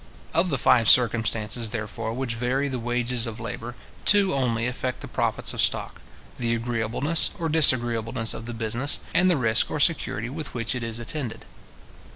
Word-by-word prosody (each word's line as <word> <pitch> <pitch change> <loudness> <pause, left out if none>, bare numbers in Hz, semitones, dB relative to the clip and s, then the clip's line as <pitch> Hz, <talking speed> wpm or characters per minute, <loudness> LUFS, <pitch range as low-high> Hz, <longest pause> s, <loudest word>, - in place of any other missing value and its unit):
Of 170 +3 +2
the 140 - 0
five 115 -3 +4
circumstances, 115 -2 +2
therefore, 110 0 -4
which 130 -1 -1
vary 125 +4 0
the 130 -2 -3
wages 120 0 -1
of 110 0 -6
labour, 115 +1 -6 0.3
two 205 -2 +4
only 120 -4 0
affect 125 0 -3
the - - -7
profits - - -1
of - - 0
stock; - - 0 0.4
the 115 -1 0
agreeableness 120 +7 0
or 165 -3 -2
disagreeableness 120 -7 +2
of 115 - -8
the 120 - -5
business, 115 +5 0
and 185 +1 +4
the 175 - +3
risk 115 -3 +2
or - - -3
security 140 -7 +2
with 150 +3 -6
which 115 -2 -2
it 125 - -4
is 115 -1 -4
attended. 120 0 -5
120 Hz, 175 wpm, -25 LUFS, 115-135 Hz, 0.4 s, five